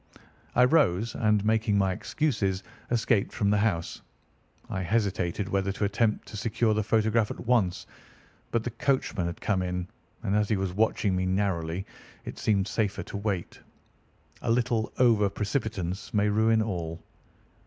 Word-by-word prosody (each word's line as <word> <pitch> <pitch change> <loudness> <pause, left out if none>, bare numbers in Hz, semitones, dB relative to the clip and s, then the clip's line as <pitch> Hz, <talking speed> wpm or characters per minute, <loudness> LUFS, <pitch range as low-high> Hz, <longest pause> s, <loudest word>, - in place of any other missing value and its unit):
I 125 - +6
rose, 115 - +3
and, 105 -2 +2
making 110 -1 +2
my 95 -1 +2
excuses, 100 -7 -1 0.3
escaped 115 -3 +1
from 100 -3 +1
the 105 - +3
house. 95 -6 -1 0.7
I 95 - -3
hesitated 95 -2 0
whether 100 -1 0
to 100 - -3
attempt 105 +2 +1
to 110 - -7
secure 110 +1 +1
the 105 - +1
photograph 110 0 +2
at - - -7
once; 110 -7 +1 0.6
but 115 -1 0
the 120 - -3
coachman 115 -7 0
had 85 - -5
come 100 -3 +1
in, 90 0 -2 0.4
and 100 - 0
as 105 -1 +2
he 110 - +2
was 95 -1 -2
watching 105 -1 +1
me 95 0 0
narrowly, 95 -2 -1 0.4
it - - -7
seemed 100 -3 +1
safer 105 -3 -1
to - - -6
wait. 100 -4 -3 0.8
A - - -3
little 115 -1 +1
over 110 -5 +4
precipitance 100 -3 -3
may 105 0 +3
ruin 110 +1 +3
all." 85 -6 -4
105 Hz, 155 wpm, -28 LUFS, 95-110 Hz, 0.8 s, I